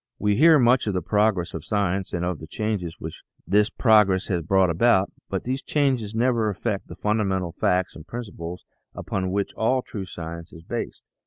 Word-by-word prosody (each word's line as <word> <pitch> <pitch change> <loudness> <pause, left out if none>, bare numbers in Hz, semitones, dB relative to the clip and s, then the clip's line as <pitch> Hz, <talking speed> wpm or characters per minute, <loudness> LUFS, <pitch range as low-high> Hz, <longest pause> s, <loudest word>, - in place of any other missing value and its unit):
We 105 0 +1
hear 160 +6 +7
much 125 -2 +3
of 100 - 0
the 90 - -1
progress 105 -3 +1
of 80 - -5
science 100 -2 -1
and 85 0 -2
of 90 -3 -2
the 80 - -9
changes 100 -5 -3
which - - -7 0.2
this 105 +3 +3
progress 105 -5 +3
has 90 -3 0
brought 95 +2 +3
about, 95 +2 +3 0.2
but 95 - -2
these 130 +2 -2
changes 130 -8 0
never 115 -2 +2
affect 100 +1 -3
the - - -9
funda 105 +1 0
mental 95 -3 -1
facts 90 +1 0
and 80 0 -11
principles 90 -6 -7 0.3
upon 95 -1 -3
which 100 +1 -1
all 125 +3 +1
true 100 -3 -6
science 85 -1 -8
is 80 - -12
based. - - -5
100 Hz, 190 wpm, -24 LUFS, 90-110 Hz, 0.3 s, hear